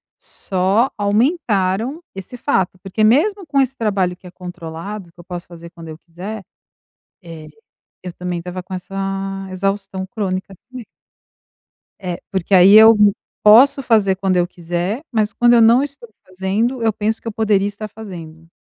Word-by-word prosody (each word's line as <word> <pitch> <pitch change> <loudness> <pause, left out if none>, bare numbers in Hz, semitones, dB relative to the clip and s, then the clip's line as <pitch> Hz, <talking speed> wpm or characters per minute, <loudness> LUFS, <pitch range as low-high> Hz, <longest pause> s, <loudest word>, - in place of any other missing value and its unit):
só 195 +7 -1
aumentaram 220 - 0
esse 195 +6 -9
fato, 190 -8 -1
porque, 195 +3 -2
mesmo 360 - +2
com 280 - +1
esse 265 0 -1
trabalho 195 -6 -1
que 180 - -15
é - - -12
controlado, 180 +1 -8
que 175 - -26
eu - - -11
posso 175 0 -8
fazer 170 -1 -12
quando 165 -2 -12
eu 155 - -9
quiser, 190 +6 -8 0.8
eh, 165 -3 -10 0.6
eu 180 - -6
também 180 0 -4
estava 180 +1 -7
com 185 +2 -13
essa 185 +1 -8 0.6
exaustão 195 0 -3
crônica 195 -2 -4 0.2
também. 255 -2 -8 1.2
É, 180 -3 -5
porque, 190 0 -1
aí, 190 +2 +7
eu 220 +1 +9 0.5
posso 250 +6 +6
fazer 210 -6 +2
quando 190 -1 0
eu 175 -1 +2
quiser, 175 +5 -4
mas 215 -3 0
quando 240 0 +4
eu 235 - +6
não 230 +4 +5
estou 280 -4 -8 0.2
fazendo, 200 +7 -2
eu 225 -1 +2
penso 220 +1 -2
que - - -6
eu - - -4
poderia 210 -2 +1
estar 205 +1 -7
fazendo,e 170 -7 -11
195 Hz, 160 wpm, -18 LUFS, 180-225 Hz, 1.2 s, eu